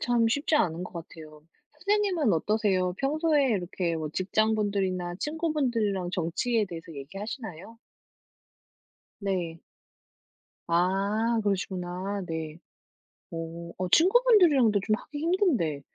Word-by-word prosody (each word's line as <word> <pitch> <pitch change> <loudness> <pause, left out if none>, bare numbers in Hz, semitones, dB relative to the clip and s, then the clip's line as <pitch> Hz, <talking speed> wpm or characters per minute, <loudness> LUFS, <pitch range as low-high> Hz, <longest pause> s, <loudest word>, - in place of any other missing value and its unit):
참 240 -1 +2
쉽지 285 +6 0
않은 175 - +1
것 - - -10
같아요. 155 -2 -10 0.3
선생님은 365 - +1
어떠세요? 185 0 +1
평소에 295 0 +2
이렇게 175 -4 -1
뭐 155 -1 -3
직장분들이나 200 -3 0
친구분들이랑 245 - -1
정치에 200 +7 0
대해서 165 -2 -8
얘기하시나요? 195 - -7 1.4
네. 175 -4 -2 1.1
아 200 +6 +1
그러시구나. 190 0 -2
네. 160 -2 -4 0.8
어 165 +1 -6
어 185 -1 -2
친구분들이랑도 350 - +5
좀 215 - +3
하기 290 +5 -9
힘든데. 300 - +1
200 Hz, 265 characters per minute, -28 LUFS, 175-255 Hz, 1.4 s, 친구분들이랑도